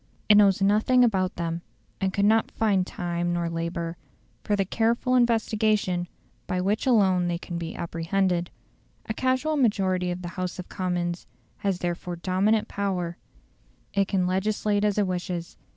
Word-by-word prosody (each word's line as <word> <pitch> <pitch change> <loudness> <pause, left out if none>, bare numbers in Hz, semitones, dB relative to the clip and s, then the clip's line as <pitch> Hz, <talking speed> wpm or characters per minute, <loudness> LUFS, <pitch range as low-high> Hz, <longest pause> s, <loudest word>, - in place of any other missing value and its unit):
It 210 - +7
knows 200 -2 +5
nothing 215 +5 +4
about 190 -5 +1
them, 170 0 -3 0.4
and 190 -1 0
could 200 +1 +1
not 220 +1 +3
find 195 -4 +1
time 175 0 -2
or 170 0 -1
labour 170 0 -3 0.5
for 210 - +1
the 195 -1 +1
careful 230 +5 +1
investigation 215 -6 +2 0.4
by 185 - -1
which 200 +7 0
alone 190 -7 +4
they 175 -1 -1
can 175 0 -6
be 165 -1 -5
apprehended. 175 +1 -1 0.6
A 220 - -3
casual 260 +6 0
majority 190 -7 +1
of 180 +1 -4
the 175 - -4
House 180 0 -4
of 185 - -8
Commons 175 -2 -2 0.3
has 195 -2 -1
therefore 175 0 -3
dominant 190 +5 +1
power: 180 -4 -2 0.8
it 200 -1 +2
can 190 -2 +1
legislate 205 +2 0
as 210 -1 +1
it 205 - +3
wishes. 180 -2 -4
185 Hz, 155 wpm, -26 LUFS, 175-210 Hz, 0.8 s, It